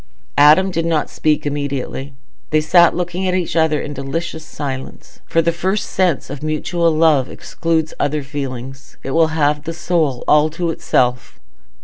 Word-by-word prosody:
Adam 155 +7 +6
did 165 -2 -1
not 165 -2 0
speak 155 -1 0
immediately. 140 -1 -4 0.3
They 155 - +3
sat 170 +2 +4
looking 180 +1 -2
at 180 - +1
each 180 -3 -2
other 160 -2 +2
in 145 - -5
delicious 160 +4 -4
silence—for 145 +3 -4
the 170 - +2
first 190 +4 -1
sense 180 -8 0
of 140 -1 -7
mutual 165 +3 0
love 155 -4 +3
excludes 160 -1 -2
other 150 0 0
feelings; 135 -1 -7
it 135 - -4
will 165 +2 +4
have 150 -1 +2
the 165 - -4
soul 160 -7 0
all 150 +1 +4
to 170 +2 -2
itself. 125 -6 -1
155 Hz, 155 wpm, -18 LUFS, 140-165 Hz, 0.3 s, Adam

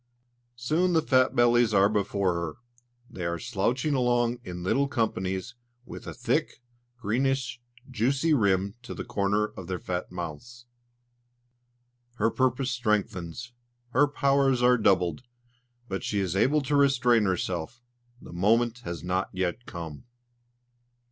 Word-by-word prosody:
Soon 160 +9 +1
the 160 - +4
fat 130 -1 +3
bellies 120 -2 +4
are 100 0 +6
before 100 -3 0
her; 85 -2 -3 0.5
they 90 - -7
are 85 0 -1
slouching 125 - -1
along 120 -2 +1
in 90 -1 -7
little 140 +9 +1
companies, 95 -7 -2 0.3
with - - -10
a - - -5
thick, - - -1 0.4
greenish, 125 +2 -1 0.3
juicy 135 +6 +1
rim 100 -5 +2
to 125 - -8
the - - -5
corners 105 -2 0
of 90 - -8
their 95 -1 -2
fat 90 0 -4
mouths. 105 +9 -7 1.5
Her 115 - +1
purpose 130 0 0
strengthens, 105 -3 -2 0.4
her 145 +4 +4
powers 135 -3 +2
are 125 -1 +5
doubled, 90 -5 +2 0.7
but 95 -3 -4
she 100 - -1
is 95 -2 -1
able 145 +9 +3
to 145 +2 0
restrain 125 -5 +4
herself: 95 +4 -2 0.4
the - - -12
moment 115 +6 +2
has 85 -8 -6
not 90 +2 -1
yet 95 +6 -3
come. 80 +1 -8
115 Hz, 135 wpm, -27 LUFS, 95-125 Hz, 1.5 s, are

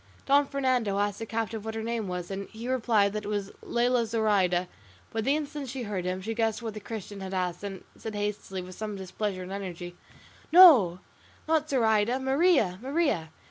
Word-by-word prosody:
Don 280 +1 +4
Fernando 255 -8 0
asked 205 0 0
the 225 - -5
captive 225 -1 -3
what 220 0 -5
her 220 - -3
name 230 -2 -2
was, 180 0 -4
and 195 0 -5
he 230 +2 -8
replied 225 -5 +2
that 215 0 -3
it - - -6
was 205 -1 -2
Lela 240 -1 +1
Zoraida; 200 -5 +2 0.4
but 225 -1 -2
the 275 - +3
instant 295 -2 -4
she 255 0 -4
heard 200 -5 -3
him, 185 +1 -2
she 225 +3 -2
guessed 225 -1 0
what 225 -2 -4
the 215 - -6
Christian 210 -2 -7
had 190 0 -5
asked, 180 0 -2
and 195 -2 -6
said 220 -2 -7
hastily, 205 -2 -3
with 185 +1 -10
some 210 +2 -5
displeasure 190 0 -4
and 180 - -8
energy, 180 -3 -6 0.6
"No, 260 - +8 0.5
not 310 -1 +1
Zoraida; 225 -2 +2
Maria, 265 - +2
Maria!" 270 - 0
215 Hz, 190 wpm, -28 LUFS, 195-245 Hz, 0.6 s, No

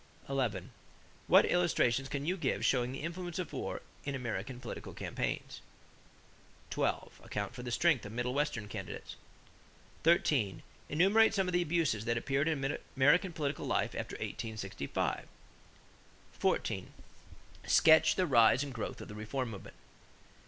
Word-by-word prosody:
11. 120 -10 -1 0.6
What - - +7
illustrations 135 -7 +2
can 140 0 -3
you 180 +4 +1
give 180 - -1
showing 125 -1 +2
the 135 +2 -6
influence 175 +1 -4
of 180 -3 -4
war - - -4 0.2
in 140 -1 -3
American 120 -1 -4
political - - -7
campaigns? - - -3 1.1
12. - - -2
Account 105 +2 -4
for 125 - -7
the 125 - -5
strength 130 +1 +3
of 100 - -7
middle 120 +2 -2
western 140 -7 -1
candidates. 95 -3 -7 0.9
13. 145 - +2 0.3
Enumerate 200 +9 +4
some 195 -2 +2
of 180 - -2
the 175 - +3
abuses 155 -10 0
that 115 0 +1
appeared 135 +5 0
in 140 -3 -1 0.2
American 165 +8 +4
political 150 -3 -3
life - - 0
after - - -5
1865. 105 -10 -3 1.1
14. - - -1 0.7
Sketch 160 0 +6
the 185 - +2
rise 125 -2 +5
and 140 -2 -6
growth 115 - -5
of - - -8
the - - -9
reform 115 +4 -3
movement. 100 - -10
135 Hz, 140 wpm, -33 LUFS, 115-165 Hz, 1.1 s, What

